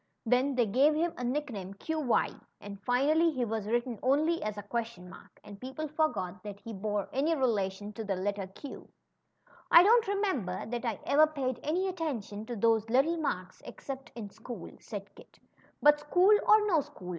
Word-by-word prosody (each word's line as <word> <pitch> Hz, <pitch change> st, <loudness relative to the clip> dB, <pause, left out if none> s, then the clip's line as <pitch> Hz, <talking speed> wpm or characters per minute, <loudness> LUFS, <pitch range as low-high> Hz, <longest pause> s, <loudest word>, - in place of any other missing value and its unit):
Then 255 Hz, +4 st, +2 dB
they 245 Hz, -2 st, +3 dB
gave 270 Hz, +9 st, +3 dB
him 330 Hz, +2 st, 0 dB
a 250 Hz, -, -6 dB
nickname, 240 Hz, -8 st, -3 dB
^Qy'; 305 Hz, +1 st, -1 dB, 0.2 s
and 200 Hz, -1 st, -9 dB
finally 295 Hz, +9 st, +3 dB
he 260 Hz, -6 st, -1 dB
was 220 Hz, -2 st, -3 dB
written 235 Hz, 0 st, -1 dB
only?, 310 Hz, +6 st, +2 dB
and 205 Hz, -2 st, -6 dB
people 265 Hz, +5 st, -5 dB
forgot 205 Hz, -, -1 dB
that 205 Hz, 0 st, -8 dB
he 230 Hz, +1 st, -8 dB
bore 205 Hz, 0 st, -2 dB
any 300 Hz, +5 st, +1 dB
relation 205 Hz, -6 st, -1 dB
to 225 Hz, -, -5 dB
the 200 Hz, -2 st, -1 dB
letter 200 Hz, +1 st, -2 dB
Q." 235 Hz, +9 st, -10 dB, 0.8 s
don't 430 Hz, +7 st, +7 dB
remember 375 Hz, -, -1 dB
that 240 Hz, +2 st, -4 dB
I 225 Hz, -4 st, -2 dB
ever 310 Hz, +2 st, +5 dB
paid 265 Hz, -5 st, -3 dB
any 355 Hz, +6 st, 0 dB
attention 245 Hz, -, -4 dB
to 240 Hz, -, -4 dB
those 225 Hz, 0 st, +2 dB
little 275 Hz, +8 st, +3 dB
marks, 185 Hz, -, -3 dB
except 270 Hz, -3 st, -8 dB
in 210 Hz, -4 st, -7 dB
school," 225 Hz, -3 st, -9 dB
said 205 Hz, -1 st, -8 dB
Kit; -, -, -17 dB, 0.5 s
but 295 Hz, 0 st, +6 dB
school 360 Hz, +7 st, +4 dB
or 425 Hz, 0 st, +6 dB
no 340 Hz, -7 st, +3 dB
school. 180 Hz, -8 st, -11 dB
245 Hz, 165 wpm, -30 LUFS, 205-305 Hz, 0.8 s, don't